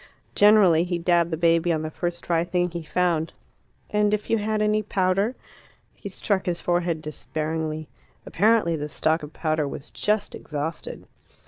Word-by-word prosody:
Generally 200 -6 +5
he 175 -1 -1
dabbed 170 0 +2
the 160 - -2
baby 170 +1 +3
on 160 -1 0
the 155 - -4
first 175 +1 -4
dry 170 -1 +1
thing 175 0 0
he 170 0 -4
found. 165 0 0 0.6
"And 210 0 +3
if 210 - -7
you 225 - +3
had 215 +1 -1
any 215 0 +2
powder." 195 +3 0 0.6
He 200 - -8
struck 195 0 -1
his 175 -1 0
forehead 175 -2 0
despairingly. 155 0 -3 0.4
Apparently 215 -5 +2
the 150 -1 -4
stock 160 +2 +1
of 150 0 -8
powder 155 -2 -1
was 140 +1 -8
just 210 0 -1
exhausted. 155 +2 -5
170 Hz, 160 wpm, -24 LUFS, 160-200 Hz, 0.6 s, Generally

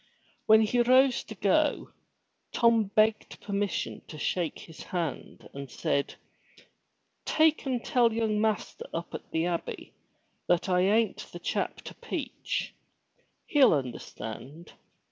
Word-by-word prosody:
When 220 0 +7
he 230 +3 +2
rose 255 +1 +4
to - - -9
go, - - +1 0.6
Tom 230 -2 +4
begged 215 +2 +1
permission 200 0 -2
to 155 - -9
shake 170 +2 -1
his 165 - -12
hand 170 -6 -4
and 140 -1 -7
said, 140 +3 -1 1.1
"Take 315 -2 +2
and 250 -3 -2
tell 240 -2 +3
young 220 -2 0
master 215 -3 -2
up 170 +1 -5
at - - -7
the 160 +1 0
abbey 175 -1 -4 0.5
that 175 +1 +2
I 180 -1 +2
ain't 215 +4 +2
the - - -7
chap - - -2
to - - -9
peach. - - -4 0.7
He'll 275 - +5
understand. 130 +3 -7
205 Hz, 125 wpm, -28 LUFS, 165-230 Hz, 1.1 s, When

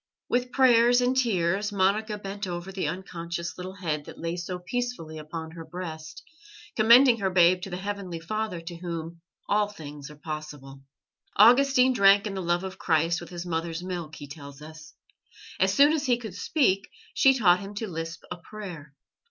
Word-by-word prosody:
With 250 0 0
prayers 245 -2 +5
and 250 +1 +1
tears, 205 -4 +1
Monica 205 +2 +1
bent 200 0 -6
over 175 +1 -5
the 190 -1 -2
unconscious 170 -2 -5
little 185 +1 -7
head 155 -6 -3
that - - -11
lay 165 +1 -3
so 180 +1 -4
peacefully 180 -5 -4
upon 160 +1 -7
her 165 0 -9
breast, 160 -2 -8 0.5
commending 235 +2 +6
her 195 -2 0
babe 180 0 +4
to 195 - -6
the 180 - -4
Heavenly 195 -3 -5
Father 215 +1 -3
to 170 +1 -8
Whom 170 -1 -6 0.3
all 210 0 +2
things 150 -8 -10
are 150 - -12
possible. 145 -3 -8 0.5
Augustine 255 +3 +6
drank 200 -2 +5
in 205 - -3
the 190 - -3
love 175 +1 0
of 190 0 -7
Christ 165 +2 +1
with 170 - -10
his 175 0 -6
mother's 165 0 -3
milk, 175 -4 -5
he 145 - -9
tells 140 -1 -11
us. 155 +1 -12 0.6
As - - +3
soon 290 +2 +5
as 295 -3 -1
he 245 -2 +3
could 220 -6 -8
speak, 200 - +1 0.2
she 270 0 +5
taught 180 -6 +5
him 200 +1 -8
to 220 +2 -3
lisp 165 -2 -6
a - - -4
prayer. 170 -6 -10
180 Hz, 180 wpm, -26 LUFS, 165-210 Hz, 0.6 s, commending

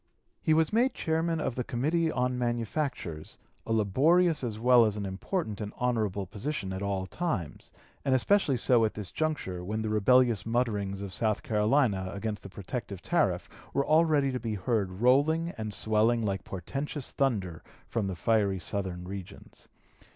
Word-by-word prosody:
He 155 - +3
was 160 +4 +2
made 245 +4 +3
chairman 165 0 0
of 140 - -1
the 125 - -2
Committee 155 +8 0
on 125 -1 0
Manufactures, 120 - -3 0.3
a - - -3
laborious 150 - +3
as 115 -4 -3
well 120 +1 +6
as 105 -2 0
an 100 - -3
important 105 - -3
and 105 -1 -4
honorable 110 -6 0
position 105 - -4
at 95 - -4
all 100 -2 -1
times, 100 - -4 0.3
and 135 -2 +2
especially 140 0 +3
so 120 -1 +3
at 110 - 0
this 105 -3 -6
juncture 145 - -2
when 110 +4 -3
the 110 - -2
rebellious 115 -1 +4
mutterings 105 -5 -1
of 100 -2 -6
South 110 -2 0
Carolina 105 -3 +2
against 105 +1 -3
the - - -9
protective 100 0 -6
tariff - - +1 0.3
were 140 - +2
already 155 -3 +3
to 125 - -2
be 110 -2 -3
heard 100 -1 0
rolling 155 +7 +3
and 110 -1 -4
swelling 110 +2 +2
like 100 -3 -1
portentous 135 - -4
thunder 100 -12 -1 0.3
from 110 -4 -1
the 95 - -3
fiery 100 +1 +1
Southern 90 0 -4
regions. 95 -1 -9
115 Hz, 165 wpm, -29 LUFS, 100-135 Hz, 0.3 s, well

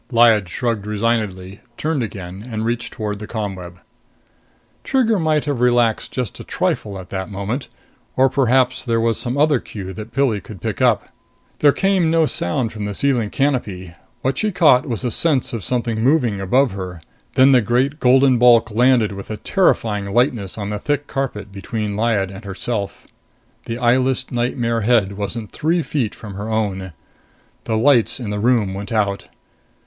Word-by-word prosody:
Lyad 115 -5 +5
shrugged 115 0 -2
resignedly, 105 -4 -2 0.2
turned 155 -3 -1
again 95 -3 -6
and 110 -1 -3
reached 120 0 -2
toward 105 -3 -4
the 105 - -7
ComWeb. 95 -6 -5 1.1
Trigger 230 -6 +2
might 155 -2 +1
have 140 -5 -2
relaxed 120 -2 +2
just 125 -5 -4
a - - -7
trifle 100 -2 -2
at 95 -1 -10
that 95 0 -4
moment. 105 +7 -4 0.5
Or 130 +1 +5
perhaps 130 -1 +2
there 115 -2 0
was 115 0 +1
some 125 +2 -3
other 145 -2 +3
cue 95 -4 -8
that 110 +2 -8
Pilli 125 -5 +1
could 100 +1 -11
pick - - -4
up. - - +2 0.5
There 145 - +6
came 190 0 +1
no 165 0 +3
sound 115 - -1
from 105 -2 -5
the 100 -1 -4
ceiling 125 -5 +1
canopy. 105 -11 -2 0.3
What 135 +1 0
she 215 -1 0
caught 150 -9 +4
was 115 +1 -3
a 125 - -1
sense 145 -1 +1
of 115 -4 -4
something 120 -3 -1
moving 125 -8 +2
above 125 +8 +2
her. 90 -3 -6 0.4
Then 130 +1 +6
the 125 -2 +6
great 130 +7 0
golden 130 -1 +4
bulk 115 -2 +5
landed 120 -1 +3
with 100 -1 -8
a 110 - -4
terrifying 105 - +1
lightness 115 -4 0
on 105 -1 -4
the 105 - -3
thick 145 +4 -1
carpet 130 -8 -4
between 100 +2 -4
Lyad 105 -3 0
and 100 +2 -10
herself. 100 +1 -4 0.6
The 115 - -4
eyeless 125 +2 +1
nightmare 120 -1 -1
head 105 -3 +3
wasn't 105 +2 -5
three 165 +2 0
feet 125 -9 -2
from 105 -3 -9
her 105 +3 -5
own. 95 -5 -2 0.7
The 110 - 0
lights 125 0 +3
in 110 -5 -4
the 105 - -2
room 110 -4 +2
went 100 +3 -6
out. 100 -3 0
115 Hz, 175 wpm, -20 LUFS, 100-130 Hz, 1.1 s, There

